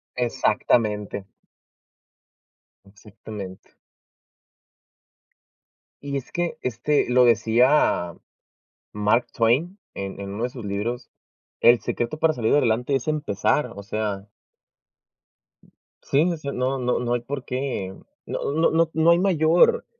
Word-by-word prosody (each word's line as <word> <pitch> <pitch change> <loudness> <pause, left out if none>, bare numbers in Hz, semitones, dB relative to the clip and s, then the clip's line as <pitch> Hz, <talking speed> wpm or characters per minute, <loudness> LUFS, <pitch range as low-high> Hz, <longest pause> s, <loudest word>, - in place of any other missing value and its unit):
Exactamente 110 -4 0 1.6
Exactamente. 105 -1 -11 2.3
Y 140 -1 -3
es 130 - -8
que, 175 -1 -2
este, 125 +5 0
lo 125 0 +5
decía 115 - +3 0.8
Mark 105 +3 +1
Twain 140 - +1 0.2
en 100 0 -6
en 100 0 -6
uno 105 +4 -5
de - - 0
sus 120 -3 -9
libros: 110 +5 -3 0.5
"El 120 -2 +5
secreto 120 +8 -3
para 160 -1 +3
salir 115 -2 +1
adelante 125 0 +2
es 135 - -3
empezar". 145 -3 0
O 100 - -7
sea 105 -1 -3 1.7
Sí, 140 - +1
o 165 - -3
sea, 140 -2 -5
no 130 +1 -1
no 125 0 0
no 120 0 -1
hay 120 - 0
por 135 +1 -6
qué, 125 -8 -3 0.3
no - - -3
no 160 +2 +2
no 165 0 +2
no 160 +1 +4
hay 170 - +4
mayor, 180 - +3
125 Hz, 120 wpm, -23 LUFS, 105-145 Hz, 2.3 s, lo